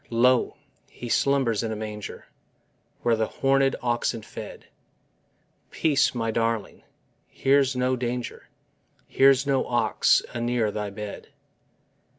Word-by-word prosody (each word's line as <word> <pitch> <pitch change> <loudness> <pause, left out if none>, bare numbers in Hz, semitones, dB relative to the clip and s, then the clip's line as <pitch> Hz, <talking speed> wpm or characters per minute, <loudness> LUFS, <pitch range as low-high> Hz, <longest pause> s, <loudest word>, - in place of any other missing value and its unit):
Lo, 125 +2 +2 0.3
He 120 - -8
slumbers 135 -5 +2
in 115 - -3
His 110 - -4
manger, 105 -1 -7 0.8
Where 120 -1 +3
the 110 0 0
hornèd 135 0 +1
oxen 120 -2 -1
fed: - - -9 1.0
Peace, 150 -5 +1
my 115 -1 -1
darling: 115 -2 -2 0.5
here's 135 -1 +2
no 125 0 +1
danger, 125 0 -5 0.6
Here's 135 0 +4
no 135 -2 +1
ox 120 -4 +2
anear 120 -2 0
thy 105 0 -4
bed. 105 0 -8
120 Hz, 115 wpm, -25 LUFS, 110-130 Hz, 1.0 s, Here's